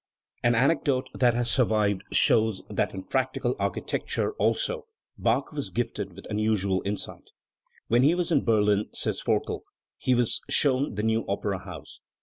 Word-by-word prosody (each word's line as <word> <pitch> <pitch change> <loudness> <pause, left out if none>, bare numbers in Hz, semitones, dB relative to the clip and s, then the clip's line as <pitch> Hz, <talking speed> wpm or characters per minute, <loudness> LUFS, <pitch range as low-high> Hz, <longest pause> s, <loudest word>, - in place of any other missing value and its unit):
An 120 0 +3
anecdote 130 0 +2
that 120 -2 +3
has 120 0 0
survived 105 -6 +2
shows 110 -3 +3
that - - -1
in 95 - -6
practical 130 +4 -1
architecture - - -1
also - - 0 0.3
Bach 120 +4 0
was 145 -2 -3
gifted 105 -5 -3
with 95 - -12
unusual 105 -3 +1
insight. 100 +1 -4 0.6
"When 120 +2 +3
he 150 +6 +4
was 175 -1 -1
in 145 - +3
Berlin", 105 -2 +2
says - - -1
Forkel, - - -1 0.4
"he 130 - +2
was 120 -2 +1
shown 135 -4 +3
the 105 - -2
new 110 0 +1
opera 100 -1 -2
house. - - -10
115 Hz, 150 wpm, -27 LUFS, 105-130 Hz, 0.6 s, he